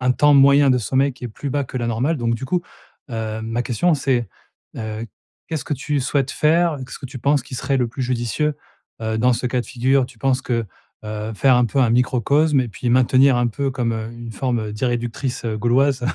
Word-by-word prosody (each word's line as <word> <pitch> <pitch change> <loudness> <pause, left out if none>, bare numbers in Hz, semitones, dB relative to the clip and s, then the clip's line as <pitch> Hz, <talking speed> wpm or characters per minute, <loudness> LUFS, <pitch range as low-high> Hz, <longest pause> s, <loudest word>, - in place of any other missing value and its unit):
un 125 0 +2
temps 145 +2 +4
moyen 140 +1 +6
de 125 - +4
sommeil 135 +4 +1
qui 125 - -10
est - - -3
plus 140 +6 -6
bas 145 +1 0
que 130 - -8
la 120 - -2
normale. 125 +8 0
Donc 115 -1 0
du 125 +4 -5
coup, 175 +6 0 0.5
heu, 110 -1 -3
ma 115 +2 -2
question 135 +8 +1
c'est, 130 -5 0 0.5
heu, 110 +1 -5 0.4
qu'est-ce 160 -4 -3
que 145 - -2
tu 145 +2 -2
souhaites 135 0 0
faire? 165 +3 +2
Qu'est-ce - - -9
que 135 - -7
tu 130 +1 -8
penses 140 +2 +2
qui 130 - -10
serait 135 +2 -1
le 125 -2 0
plus 130 +3 -5
judicieux, 125 +5 -1 0.5
heu, 110 0 -2
dans 125 +2 +3
ce 125 +2 -1
cas 125 0 0
de - - -15
figure? 130 +2 +2
Tu 125 -3 -17
penses 130 0 +1
que, 115 -3 -1 0.4
heu, 105 +1 -4
faire 130 +3 +4
un 125 - +4
peu 130 - -2
un 120 -3 +3
microcosme 135 +4 +2
et 125 - -2
puis 120 +4 -4
maintenir 130 +1 +4
un 120 - +2
peu 135 +4 -2
comme, 125 -3 -1
heu, 110 0 -4
une 120 -1 -8
forme 115 -3 -2
d'irréductible 120 +2 -2
gauloise, 120 +4 +1
125 Hz, 225 wpm, -21 LUFS, 115-135 Hz, 0.5 s, moyen